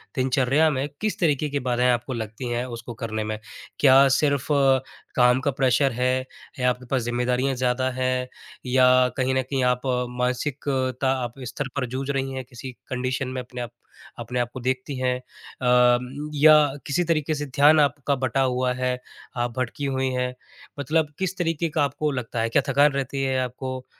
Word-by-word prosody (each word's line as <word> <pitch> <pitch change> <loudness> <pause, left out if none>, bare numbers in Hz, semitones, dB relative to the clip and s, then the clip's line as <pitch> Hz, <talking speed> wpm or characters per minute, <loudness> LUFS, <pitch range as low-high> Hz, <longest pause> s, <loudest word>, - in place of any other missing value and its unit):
दिनचर्या 135 +4 +2
में 140 -1 -1
किस 215 -1 -1
तरीके 150 -3 +1
की 145 0 -1
बाधाएँ 125 -1 +1
आपको 120 +2 -2
लगती 115 +1 -5
हैं, 120 +1 -1
उसको 120 -1 -7
करने 110 -2 -4
में? 110 0 -4 0.4
क्या 135 0 +7
सिर्फ़ 140 -2 +1 0.7
काम 125 0 +4
का 140 - 0
प्रेशर 135 0 +2
है 125 +2 0 0.3
या 125 - +3
आपके 125 0 -3
पास 130 - +2
ज़िम्मेदारियाँ 125 +3 0
ज़्यादा 125 +1 0
हैं 130 0 -1 0.4
या 125 0 +4 0.3
कहीं 130 0 +1
न 130 - +3
कहीं 130 0 -2
आप 125 0 +2 0.4
मानसिकता 130 +1 -1
आप 120 - -4
स्तर 135 +3 -4
पर 140 -2 0
जूझ 130 +3 -5
रही 135 -1 -2
हैं, 130 -1 -4
किसी 125 +1 -9 0.2
कंडीशन 130 +1 -2
में 130 0 -4
अपने 125 0 -8
आप 120 - -6 0.5
अपने 125 - -3
आप 120 -1 0
को 130 - -6
देखती 130 +2 -2
हैं? 125 -1 +1
अ, 125 -1 +1 0.4
या 155 +2 +7 0.3
किसी 160 +5 +1
तरीके 160 -2 0
से 145 - -3
ध्यान 145 +3 +5
आपका 140 -1 +1
बटा 130 +2 +1
हुआ 125 -1 +1
है, 125 0 -1 0.4
आप 120 0 -1
भटकी 130 +3 -2
हुई 130 -1 0
हैं, 125 0 -1 0.5
मतलब 150 +1 0
किस 190 0 -2
तरीके 165 -1 -1
का 155 -1 +1
आपको 145 +2 -1
लगता 120 -3 -3
है, 115 - 0
क्या 140 - +3
थकान 140 +2 +4
रहती 140 0 -3
है 130 -1 0
आपको 130 +1 -5
130 Hz, 180 wpm, -24 LUFS, 125-140 Hz, 0.7 s, क्या